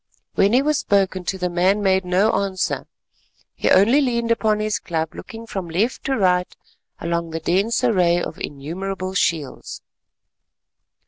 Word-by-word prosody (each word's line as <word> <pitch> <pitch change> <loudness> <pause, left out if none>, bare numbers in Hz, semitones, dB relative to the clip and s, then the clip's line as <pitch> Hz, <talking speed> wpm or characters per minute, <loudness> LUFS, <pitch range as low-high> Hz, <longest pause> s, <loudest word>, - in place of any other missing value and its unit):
When 200 +3 +3
he 260 +3 +4
was 300 0 +1
spoken 190 -2 +1
to, 190 - -2
the 180 -1 -1
man 185 +4 +1
made 190 -1 +3
no 185 +5 +3
answer; 195 -2 -1 0.7
he - - -1
only 230 +10 +5
leaned 235 -3 0
upon 220 -2 +2
his 215 0 -1
club 160 -2 -3
looking 225 0 -9
from 190 -6 -5
left 200 +9 -1
to 270 -1 0
right 180 -2 +2 0.5
along 170 0 -2
the 165 0 -4
dense 195 +10 0
array 180 -7 +3
of - - -5
innumerable 185 +6 -5
shields. 160 -7 -2
190 Hz, 150 wpm, -21 LUFS, 175-215 Hz, 0.7 s, only